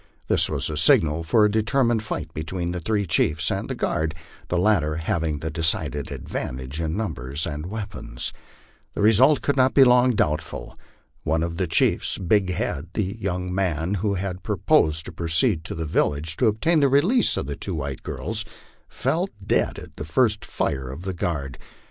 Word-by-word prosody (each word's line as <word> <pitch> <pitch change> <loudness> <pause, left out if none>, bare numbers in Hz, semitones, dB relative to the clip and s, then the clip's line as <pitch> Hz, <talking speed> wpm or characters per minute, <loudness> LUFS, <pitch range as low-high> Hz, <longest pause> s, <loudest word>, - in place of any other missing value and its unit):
This - - +2
was - - -2
the 75 - -2
signal 80 0 +4
for 105 +7 +3
a 105 - +2
determined 110 +1 +1
light 80 0 -4
between 85 +3 -3
the 90 - -3
three 100 +3 -1
chiefs 80 -2 +1
and - - -3
the - - -2
guard, 80 0 -1 0.3
the 90 - -1
latter 85 -5 +2
having 80 -1 -1
the 80 +2 -4
decided 80 -3 +1
advantage 65 +5 -5
in 80 +2 -2
numbers 75 - -3
and 75 0 -5
weapons. 100 - -4 0.6
The - - -1
result 125 +7 +5
could 145 - +1
not 130 -1 +3
be 135 - +8
long 125 -1 +5
doubtful. 75 -6 -2 0.5
One 80 +1 0
of 85 0 -4
the 95 -1 0
chiefs, - - +2
Big 95 +1 +1
Head, 85 -3 -2
the 100 -1 -1
young 90 -2 -3
man 90 -2 -1
who 100 -1 0
had 95 -1 -4
proposed 80 +1 +2
to - - -7
proceed 85 +3 +2
to - - -4
the 80 0 -3
village 75 +1 0
and 125 - +4
obtain 155 +10 +2
the 140 -2 +4
release 180 - +3
of - - -2
the 70 0 -4
two 95 +3 -4
white 70 -3 -4
girls, - - -3 0.5
fell - - -1 0.2
dead - - +1
at - - -11
the - - -5
first 105 +6 +1
fire 65 -2 -2
of 70 +7 -8
the 95 0 -3
guard. 75 -6 -3
85 Hz, 185 wpm, -24 LUFS, 80-105 Hz, 0.6 s, be